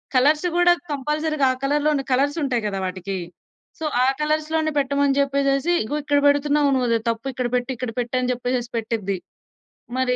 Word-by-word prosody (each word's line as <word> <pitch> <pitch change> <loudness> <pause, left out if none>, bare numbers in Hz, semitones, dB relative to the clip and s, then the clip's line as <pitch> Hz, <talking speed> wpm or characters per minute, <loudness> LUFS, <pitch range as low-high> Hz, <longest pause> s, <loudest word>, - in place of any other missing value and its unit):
Colours 300 +6 +4
గూడా 350 0 +5 0.2
కంపల్సరీగా 300 +1 0
ఆ - - -6
కలర్‌లోనే 290 0 +1
కలర్స్ 280 +4 +2
ఉంటాయి 245 -5 0
గదా! 195 -1 -3
వాటికి. 185 +1 -4 0.6
సో, 320 - -3 0.2
ఆ - - +4 0.2
కలర్స్‌లోనే 310 +1 0
పెట్టమని 280 0 +1
జెప్పేసేసి 275 +3 +1
"ఇగో 280 +7 -3
ఇక్కడ 290 -1 +2
బెడుతున్నావు 285 0 +3
నువ్వది 240 -3 +1
తప్పు 230 +3 -3
ఇక్కడ 250 -1 -1
పెట్టు 250 +2 -1
ఇక్కడ 240 -1 -4
పెట్టు" 240 0 -3
అని 255 0 -1
జెప్పేసేసి 245 -1 -2
పెట్టిది. 215 -4 -2 0.8
మరి 255 -1 +1
275 Hz, 160 wpm, -22 LUFS, 245-295 Hz, 0.8 s, గూడా